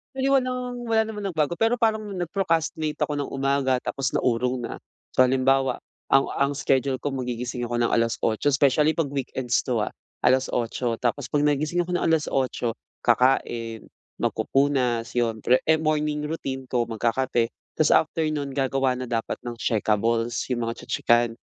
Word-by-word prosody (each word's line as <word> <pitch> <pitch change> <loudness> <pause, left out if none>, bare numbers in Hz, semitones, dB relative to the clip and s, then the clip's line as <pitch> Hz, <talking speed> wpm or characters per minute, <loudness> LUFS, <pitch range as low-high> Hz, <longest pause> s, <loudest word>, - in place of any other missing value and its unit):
Actually 270 +1 0
walang, 250 -2 0
wala 225 -1 +3
namang 210 -2 -6
nagbago 155 +2 0
pero 225 +2 +1
parang 220 -2 +2
nag-procrastinate 165 -4 -1
ako 150 - 0
ng 145 -1 -3
umaga 135 -1 +1
tapos 135 0 -2
naurong 125 +1 0
na. 120 - -5 0.4
So 130 - +7
halimbawa, 130 0 +2 0.3
ang 135 0 +5
ang 140 +1 +2
schedule 135 -1 0
ko - - -2
magigising 125 -1 -3
ako 120 0 -2
ng 120 - +3
alas-otso 115 +3 +1
specially 145 +3 +3
'pag 160 -3 -1
weekends 130 -3 -1
'to, 120 -3 0
ah. 105 - 0 0.3
Alas-otso 125 -2 +1
tapos 125 +2 -2
'pag 145 - +2
nagising 150 +4 +1
ako 175 0 -1
ng - - -1
alas-otso 135 -7 0 0.2
kakain, 120 -2 +1 0.3
magpupunas 130 -4 +1
'yon 115 -2 0
pre 125 +1 +3
eh, 160 0 +3
morning 150 -1 0
routine 135 -5 -4
ko, 120 -2 +1
magkakape 115 +1 0 0.2
tas 155 - +2
after 160 +1 +3
nun, 145 -2 -3
gagawa 135 -1 +1
na 125 0 -5
dapat 115 -2 -2
ng 120 -1 -6
checkables, 115 +1 0
'yong 120 - -1
mga 115 - -6
tse-tsekan 120 0 +2
135 Hz, 155 wpm, -25 LUFS, 120-155 Hz, 0.4 s, So